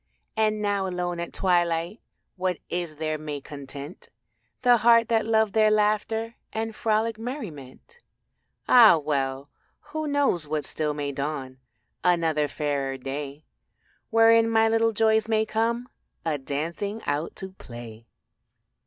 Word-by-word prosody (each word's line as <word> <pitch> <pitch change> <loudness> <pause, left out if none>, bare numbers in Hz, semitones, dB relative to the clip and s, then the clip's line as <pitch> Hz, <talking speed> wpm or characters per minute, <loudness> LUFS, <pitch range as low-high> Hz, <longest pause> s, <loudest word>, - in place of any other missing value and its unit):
And 215 -1 +1
now 200 -2 0
alone 180 -1 -3
at 170 - -4
twilight 175 +1 0 0.4
What 185 -2 -1
is 175 -3 -3
there 155 0 -2
may 150 -1 -5
content 140 +2 -9 0.5
The 245 -1 +6
heart 230 0 +5
that 225 -1 +2
loved 220 -2 +2
their 215 -1 +4
laughter 215 +2 0
And 225 0 -3
frolic 220 0 0
merriment? 225 - -8 0.7
Ah 230 -8 +8
well, 140 -2 -2 0.4
who 310 0 -2
knows 280 - +1
but 150 0 -2
still 150 -1 -2
may 145 -1 -3
dawn 135 -2 -4 0.4
Another 165 -4 +2
fairer 140 -2 -2
day 140 +3 -6 0.6
Wherein 225 0 +5
my 225 0 +4
little 225 0 +2
joys 220 0 +2
may 220 -1 +2
come 230 +3 -1 0.4
A 155 -3 0
dancing 170 +10 -4
out 145 +3 -2
to 190 -1 -6
play. 120 - -11
180 Hz, 130 wpm, -26 LUFS, 150-225 Hz, 0.7 s, Ah